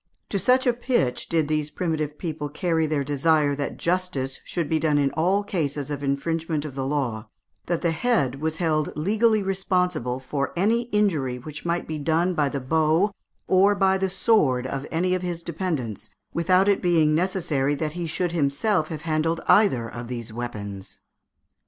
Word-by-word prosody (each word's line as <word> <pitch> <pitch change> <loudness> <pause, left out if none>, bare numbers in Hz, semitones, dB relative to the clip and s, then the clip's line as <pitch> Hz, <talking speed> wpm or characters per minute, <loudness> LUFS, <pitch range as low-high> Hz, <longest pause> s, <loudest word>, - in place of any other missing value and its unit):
To 200 - 0
such 250 +7 +3
a 245 - +4
pitch 240 - -1
did 160 -3 +2
these 155 -1 -1
primitive 155 -3 -2
people 155 -4 -4
carry 160 0 0
their 150 -2 0
desire 145 +1 +2
that 140 0 -3
justice 170 -7 -1
should 170 -4 -3
be 160 +1 +1
done 150 -1 +2
in 140 -1 +2
all 185 +5 +1
cases 150 -7 -2
of 145 -1 -4
infringement 155 +2 -1
of 145 - -6
the 135 0 -3
law, 120 -6 -2 0.4
that 170 0 -1
the 170 - +2
head 160 - 0
was 160 0 -1
held 155 -4 0
legally 215 +5 +2
responsible 180 -9 0
for 140 +2 -3
any 225 +7 +2
injury 160 - +1
which 150 +5 -9
might 170 +1 -1
be 155 -1 -4
done 165 +5 +1
by 150 -4 +1
the 140 - -3
bow 160 +8 +2 0.4
or 195 +2 +4
the 190 -1 +2
sword 180 - +2
of 135 +2 -4
any 180 +3 0
of 185 - 0
his 175 -2 -4
dependents, 150 - -3 0.2
without 185 +3 +3
it 200 -1 +3
being 165 -4 +3
necessary 160 -5 0
that 155 +1 -3
he 175 -1 -4
should 175 +2 -1
himself 155 +3 +1
have 155 -2 -6
handled 165 +1 0
either 180 - +4
of 120 +1 -7
these 120 -2 -6
weapons. 100 -5 -6
160 Hz, 175 wpm, -24 LUFS, 140-180 Hz, 0.4 s, a